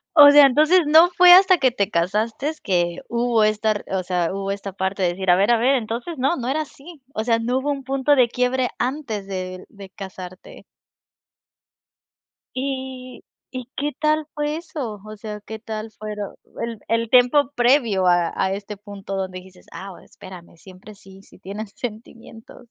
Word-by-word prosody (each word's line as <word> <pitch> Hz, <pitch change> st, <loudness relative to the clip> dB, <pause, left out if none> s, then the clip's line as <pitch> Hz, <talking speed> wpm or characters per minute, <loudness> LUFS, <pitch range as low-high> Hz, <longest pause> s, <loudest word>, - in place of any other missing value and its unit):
O 290 Hz, -2 st, +10 dB
sea, 290 Hz, -1 st, +8 dB
entonces 310 Hz, +7 st, +4 dB
no 325 Hz, +3 st, +7 dB
fue 360 Hz, 0 st, +6 dB
hasta 375 Hz, 0 st, +7 dB
que 260 Hz, -2 st, +3 dB
te 200 Hz, -5 st, -1 dB
casaste 215 Hz, -, -1 dB
que 175 Hz, -2 st, 0 dB
hubo 235 Hz, -2 st, +1 dB
esta 215 Hz, +1 st, +1 dB
r 205 Hz, -, -3 dB
o 185 Hz, -, -1 dB
sea, 175 Hz, -1 st, -1 dB
hubo 195 Hz, 0 st, -3 dB
esta 200 Hz, -1 st, -6 dB
parte 190 Hz, 0 st, -2 dB
de 175 Hz, -, +3 dB
decir, 190 Hz, +1 st, -3 dB
a 175 Hz, -, +7 dB
ver, 200 Hz, +5 st, +2 dB
a 235 Hz, -, +4 dB
ver, 255 Hz, +4 st, +3 dB
entonces 240 Hz, +7 st, -4 dB
no, 270 Hz, +6 st, +1 dB
no 245 Hz, -5 st, -5 dB
era 310 Hz, +3 st, 0 dB
así. 305 Hz, +1 st, -12 dB
O 220 Hz, -, -2 dB
sea, 230 Hz, 0 st, +1 dB
no 245 Hz, +3 st, 0 dB
hubo 290 Hz, +2 st, -2 dB
un 275 Hz, -1 st, -4 dB
punto 275 Hz, +2 st, +1 dB
de 250 Hz, -3 st, +4 dB
quiebre 250 Hz, +1 st, 0 dB
antes 245 Hz, -6 st, -3 dB
de 185 Hz, -1 st, -6 dB
de 200 Hz, -2 st, -12 dB
casarte. 185 Hz, -1 st, -10 dB, 1.9 s
¿Y 260 Hz, -1 st, -5 dB, 0.3 s
y 255 Hz, -2 st, -7 dB
qué 290 Hz, +1 st, -2 dB
tal 305 Hz, 0 st, +1 dB
fue 295 Hz, +1 st, -2 dB
eso? 275 Hz, -, -6 dB
O 215 Hz, 0 st, -9 dB
sea, 210 Hz, 0 st, -7 dB
¿qué 220 Hz, +1 st, -8 dB
tal 220 Hz, 0 st, -6 dB
fuero 210 Hz, -1 st, -7 dB, 0.3 s
el 230 Hz, -2 st, -4 dB
el 230 Hz, 0 st, 0 dB
tiempo 255 Hz, +2 st, +4 dB
previo 240 Hz, -6 st, +2 dB
a 175 Hz, -1 st, +3 dB
a 190 Hz, -, 0 dB
este 205 Hz, +1 st, -6 dB
punto 200 Hz, -1 st, -8 dB
donde 185 Hz, -1 st, -4 dB
dijiste: 185 Hz, 0 st, -17 dB
"Ah, 195 Hz, -, -8 dB
espérame, 180 Hz, -2 st, -13 dB
siempre 190 Hz, +4 st, -14 dB
sí, 195 Hz, 0 st, -16 dB
sí -, -, -20 dB
tienen 200 Hz, +3 st, -7 dB
sentimientos?". 225 Hz, +2 st, -10 dB
225 Hz, 180 wpm, -22 LUFS, 195-265 Hz, 1.9 s, O